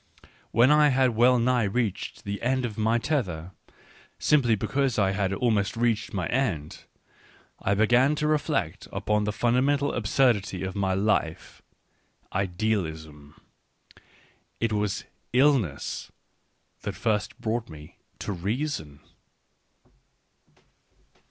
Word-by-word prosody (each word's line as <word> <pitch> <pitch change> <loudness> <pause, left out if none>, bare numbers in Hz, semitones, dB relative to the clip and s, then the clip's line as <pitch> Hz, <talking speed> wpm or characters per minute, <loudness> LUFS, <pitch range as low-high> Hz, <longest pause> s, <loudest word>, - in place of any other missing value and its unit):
When 120 +5 +4
I 150 0 +6
had 130 -2 +3
well 120 +3 +4
nigh 120 -1 +2
reached 105 0 -2
the 100 0 -4
end 130 +1 0
of 110 -3 -5
my 110 +2 +2
tether, 95 - -2 0.7
simply 130 -7 +3
because 135 +4 -1
I 100 -2 +3
had 95 -1 -1
almost 105 0 0
reached 115 -3 0
my 95 -5 -2
end, 100 - -2 0.8
I 100 - +1
began 120 +7 +4
to 150 - -2
reflect 150 - -1
upon 105 0 0
the 105 - 0
fundamental 130 +6 +1
absurdity 105 -5 +1
of 95 0 -3
my 95 -2 0
life 95 -5 -1 0.2
— - - -42
" - - -28
Idealism." 80 -7 -3 1.2
It 115 -1 0
was 105 -1 -1 0.3
illness 125 - +1 0.7
that - - -4
first 110 +1 -1
brought 115 0 -2
me 75 -1 -12 0.2
to - - -3
reason. 100 - -3
110 Hz, 120 wpm, -26 LUFS, 95-125 Hz, 1.2 s, I